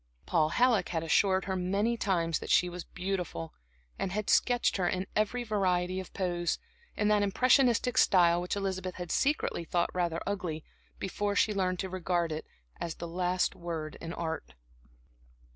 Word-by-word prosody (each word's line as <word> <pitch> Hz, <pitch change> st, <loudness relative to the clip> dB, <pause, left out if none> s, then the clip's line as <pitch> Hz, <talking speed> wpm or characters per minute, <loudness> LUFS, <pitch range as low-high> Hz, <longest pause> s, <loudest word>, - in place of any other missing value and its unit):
Paul 155 Hz, -3 st, +2 dB
Halleck 235 Hz, -1 st, +3 dB
had 165 Hz, -2 st, -1 dB
assured 190 Hz, +3 st, +3 dB
her 190 Hz, -, -2 dB
many 200 Hz, +6 st, 0 dB
times 170 Hz, -7 st, 0 dB
that -, -, -8 dB
she 180 Hz, -, +4 dB
was 175 Hz, 0 st, -6 dB
beautiful, 180 Hz, -, -4 dB, 0.5 s
and 190 Hz, -, -1 dB
had 210 Hz, +1 st, -1 dB
sketched 245 Hz, -4 st, +3 dB
her 180 Hz, -2 st, +1 dB
in 185 Hz, +1 st, -1 dB
every 215 Hz, +4 st, +1 dB
variety 185 Hz, -4 st, 0 dB
of 190 Hz, -, -8 dB
pose, 175 Hz, -2 st, -1 dB, 0.4 s
in 210 Hz, -, +2 dB
that 210 Hz, -1 st, +4 dB
impressionistic 245 Hz, +3 st, +3 dB
style 175 Hz, -2 st, +5 dB
which 180 Hz, -, -2 dB
Elizabeth 190 Hz, -2 st, -3 dB
had 175 Hz, -2 st, -6 dB
secretly 280 Hz, -, +1 dB
thought 170 Hz, +1 st, 0 dB
rather 170 Hz, -2 st, 0 dB
ugly, 175 Hz, -6 st, -3 dB, 0.3 s
before 205 Hz, +2 st, -2 dB
she 210 Hz, -, +3 dB
learned 185 Hz, -2 st, 0 dB
to 190 Hz, -, -3 dB
regard 175 Hz, -2 st, -1 dB
it 155 Hz, 0 st, -5 dB, 0.3 s
as 165 Hz, -2 st, -4 dB
the 170 Hz, -, -6 dB
last 180 Hz, +1 st, 0 dB
word 165 Hz, -3 st, -5 dB
in 165 Hz, -, -5 dB
Art. 160 Hz, -, -5 dB
185 Hz, 165 wpm, -30 LUFS, 170-200 Hz, 0.5 s, style